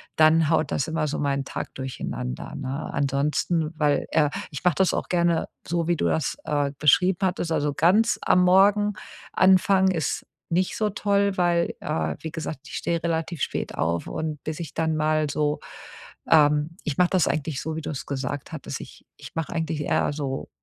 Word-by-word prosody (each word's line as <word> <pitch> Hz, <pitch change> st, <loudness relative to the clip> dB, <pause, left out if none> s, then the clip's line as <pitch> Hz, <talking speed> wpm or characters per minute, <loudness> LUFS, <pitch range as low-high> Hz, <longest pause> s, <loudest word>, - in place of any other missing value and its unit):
dann 155 Hz, 0 st, +5 dB
haut 160 Hz, -2 st, +2 dB
das 135 Hz, -, 0 dB
immer 160 Hz, -1 st, -1 dB
so 145 Hz, -, -2 dB
meinen 140 Hz, -1 st, 0 dB
Tag -, -, -6 dB
durcheinander, 125 Hz, -, -5 dB
ne? 135 Hz, +3 st, -4 dB
Ansonsten, 150 Hz, +4 st, 0 dB
weil, 145 Hz, -2 st, +2 dB
äh 150 Hz, -2 st, +3 dB, 0.2 s
ich 140 Hz, -, -7 dB
mache 180 Hz, -4 st, +3 dB
das 190 Hz, +3 st, +2 dB
auch -, -, -2 dB
gerne 170 Hz, -2 st, +2 dB, 0.2 s
so, 170 Hz, -1 st, -1 dB
wie 175 Hz, -, +2 dB
du -, -, 0 dB
das, 160 Hz, -, 0 dB
äh, 145 Hz, -1 st, 0 dB
beschrieben 175 Hz, +5 st, +4 dB
hattest. 180 Hz, -3 st, 0 dB
Also 145 Hz, -2 st, 0 dB
ganz 195 Hz, +10 st, +3 dB
am 180 Hz, -, +4 dB
Morgen 205 Hz, +3 st, +5 dB, 0.4 s
anfangen 190 Hz, 0 st, +4 dB
ist 160 Hz, -5 st, -2 dB, 0.2 s
nicht 180 Hz, +2 st, 0 dB
so 215 Hz, -1 st, +1 dB
toll, 200 Hz, -1 st, +1 dB
weil, 175 Hz, -1 st, +2 dB
äh, 80 Hz, -2 st, -2 dB
wie 160 Hz, -, -5 dB
gesagt, 160 Hz, -2 st, -5 dB
ich -, -, -8 dB
stehe 170 Hz, -1 st, -1 dB
relativ 165 Hz, -1 st, -2 dB
spät -, -, -2 dB
auf 85 Hz, +1 st, -1 dB
und 155 Hz, -2 st, -4 dB
bis 155 Hz, +1 st, -4 dB
ich 165 Hz, -, -7 dB
dann 160 Hz, -1 st, 0 dB
mal 155 Hz, 0 st, +1 dB
so, 150 Hz, +1 st, 0 dB, 0.7 s
ähm 150 Hz, +1 st, +4 dB
ich 150 Hz, -4 st, -3 dB
mache 180 Hz, -1 st, +4 dB
das 185 Hz, -5 st, +3 dB
eigentlich 150 Hz, -1 st, -2 dB
so, 160 Hz, 0 st, -4 dB
wie 160 Hz, -, -4 dB
du 150 Hz, -, -5 dB
es 140 Hz, -, -5 dB
gesagt 140 Hz, +2 st, -4 dB
hattest. 155 Hz, -, -5 dB
Ich -, -, -13 dB
ich -, -, -12 dB
mache 165 Hz, +1 st, -3 dB
eigentlich 160 Hz, -2 st, -2 dB
eher 145 Hz, -, +1 dB
so 140 Hz, -2 st, -4 dB
160 Hz, 190 wpm, -25 LUFS, 145-175 Hz, 0.7 s, dann